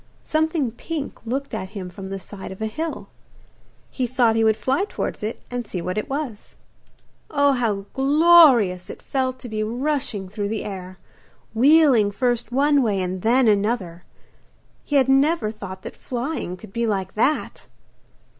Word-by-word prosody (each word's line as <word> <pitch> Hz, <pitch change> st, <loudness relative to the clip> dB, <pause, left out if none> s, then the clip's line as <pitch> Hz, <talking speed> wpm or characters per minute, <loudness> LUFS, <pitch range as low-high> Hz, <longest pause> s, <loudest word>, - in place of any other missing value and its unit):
Something 315 Hz, -5 st, 0 dB
pink 280 Hz, 0 st, -6 dB
looked 275 Hz, +4 st, -3 dB
at 190 Hz, -, -4 dB
him 185 Hz, -2 st, -6 dB
from 190 Hz, +1 st, -8 dB
the 195 Hz, 0 st, -4 dB
side 190 Hz, 0 st, -9 dB
of 190 Hz, -, -9 dB
a 220 Hz, -, -2 dB
hill. 310 Hz, +9 st, -4 dB, 0.8 s
He 255 Hz, -2 st, -1 dB
thought 240 Hz, -2 st, +2 dB
he 225 Hz, -, +2 dB
would 220 Hz, -1 st, +3 dB
fly 265 Hz, -, 0 dB
towards -, -, -4 dB
it 215 Hz, +2 st, -4 dB
and 245 Hz, -2 st, -4 dB
see 185 Hz, -, -4 dB
what 180 Hz, +2 st, -3 dB
it 215 Hz, -, -3 dB
was. 270 Hz, -6 st, -5 dB, 0.7 s
Oh, 285 Hz, -1 st, +3 dB
how 220 Hz, -7 st, -1 dB
glorious 270 Hz, -, +5 dB
it -, -, -8 dB
felt 260 Hz, -1 st, -2 dB
to 250 Hz, -, -7 dB
be 215 Hz, -2 st, -3 dB
rushing 245 Hz, -3 st, -2 dB
through 205 Hz, +1 st, -4 dB
the 220 Hz, 0 st, -3 dB
air, 185 Hz, -2 st, -7 dB, 0.6 s
wheeling 265 Hz, -3 st, +5 dB
first 240 Hz, +3 st, -1 dB
one 285 Hz, +2 st, +3 dB
way 210 Hz, -5 st, +1 dB
and 185 Hz, 0 st, -3 dB
then 245 Hz, +5 st, +3 dB, 0.2 s
the 210 Hz, -, +1 dB
other! 180 Hz, -7 st, -4 dB, 0.8 s
He 290 Hz, -, -3 dB
had 265 Hz, -2 st, +4 dB
never 270 Hz, -3 st, +3 dB
thought 190 Hz, -3 st, -9 dB
that -, -, -8 dB
flying 245 Hz, -, -4 dB
could 195 Hz, +1 st, -13 dB
be 235 Hz, 0 st, 0 dB
like 190 Hz, -3 st, -2 dB
that! 270 Hz, +8 st, 0 dB
235 Hz, 170 wpm, -22 LUFS, 200-275 Hz, 0.8 s, glorious